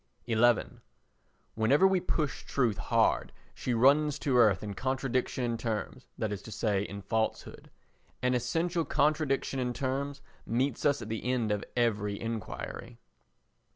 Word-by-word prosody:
xi 115 Hz, -, -1 dB, 1.2 s
Whenever 135 Hz, +11 st, +4 dB
we 190 Hz, -1 st, +4 dB
push 155 Hz, -5 st, -2 dB
truth 120 Hz, -7 st, 0 dB
hard -, -, +2 dB, 0.2 s
she 125 Hz, -, -3 dB
runs 145 Hz, +5 st, +4 dB
to 140 Hz, -2 st, 0 dB
earth 110 Hz, -6 st, +5 dB
in 105 Hz, -1 st, -4 dB
contradiction 130 Hz, +1 st, -1 dB
in 115 Hz, -1 st, -1 dB
terms, 110 Hz, -4 st, -4 dB
that 110 Hz, -1 st, -2 dB
is 100 Hz, -, -5 dB
to 110 Hz, -, -10 dB
say, 105 Hz, -3 st, 0 dB
in 100 Hz, 0 st, -6 dB
falsehood. 110 Hz, +2 st, -2 dB, 0.5 s
An 125 Hz, 0 st, +1 dB
essential 165 Hz, +8 st, 0 dB
contradiction 145 Hz, -3 st, +1 dB
in 125 Hz, -1 st, -1 dB
terms 140 Hz, +3 st, -3 dB, 0.2 s
meets 130 Hz, +4 st, -1 dB
us 145 Hz, -1 st, +1 dB
at 110 Hz, -, -8 dB
the 110 Hz, -1 st, -3 dB
end 120 Hz, -4 st, 0 dB
of 105 Hz, -1 st, -1 dB
every 105 Hz, -4 st, +1 dB
enquiry. 115 Hz, -2 st, -5 dB
125 Hz, 145 wpm, -30 LUFS, 110-140 Hz, 1.2 s, earth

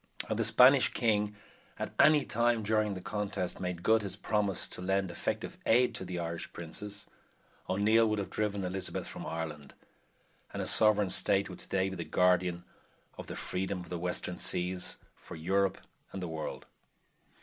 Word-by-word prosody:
Had -, -, -2 dB
the -, -, +2 dB
Spanish 130 Hz, +1 st, +7 dB
king 105 Hz, -3 st, +1 dB, 0.4 s
at -, -, -4 dB
any 150 Hz, -2 st, +6 dB
time 115 Hz, 0 st, +1 dB
during 105 Hz, -1 st, +1 dB
the 95 Hz, -, -6 dB
contest 100 Hz, -2 st, -3 dB
made 90 Hz, -1 st, -4 dB
good 110 Hz, 0 st, +4 dB
his 100 Hz, -2 st, -5 dB
promise 105 Hz, -3 st, 0 dB
to -, -, -8 dB
lend 95 Hz, 0 st, 0 dB
effective -, -, -4 dB
aid 125 Hz, +2 st, +4 dB
to -, -, -4 dB
the 90 Hz, -1 st, -5 dB
Irish 85 Hz, -1 st, -4 dB
princes, 100 Hz, +4 st, -6 dB, 0.6 s
O'Neill 110 Hz, +4 st, +4 dB
would 110 Hz, -, 0 dB
have 100 Hz, -, -4 dB
driven 100 Hz, -3 st, -1 dB
Elizabeth 95 Hz, +1 st, -3 dB
from -, -, -7 dB
Ireland, 75 Hz, -3 st, -6 dB, 0.8 s
and -, -, -4 dB
a -, -, -1 dB
sovereign 105 Hz, -3 st, +4 dB
State 95 Hz, +2 st, +2 dB
would 90 Hz, -, -10 dB
today 95 Hz, 0 st, -1 dB
be 95 Hz, -, -5 dB
the 85 Hz, -, -3 dB
guardian 90 Hz, -1 st, +2 dB, 0.6 s
of -, -, -7 dB
the -, -, -6 dB
freedom 95 Hz, 0 st, -3 dB
of 85 Hz, -, -11 dB
the 90 Hz, -, -4 dB
western 90 Hz, 0 st, -3 dB
seas 90 Hz, +1 st, 0 dB, 0.2 s
for -, -, -11 dB
Europe 95 Hz, +4 st, +1 dB, 0.3 s
and 95 Hz, -, -5 dB
the 90 Hz, -, -4 dB
world. 80 Hz, -1 st, -5 dB
95 Hz, 170 wpm, -31 LUFS, 90-105 Hz, 0.8 s, Spanish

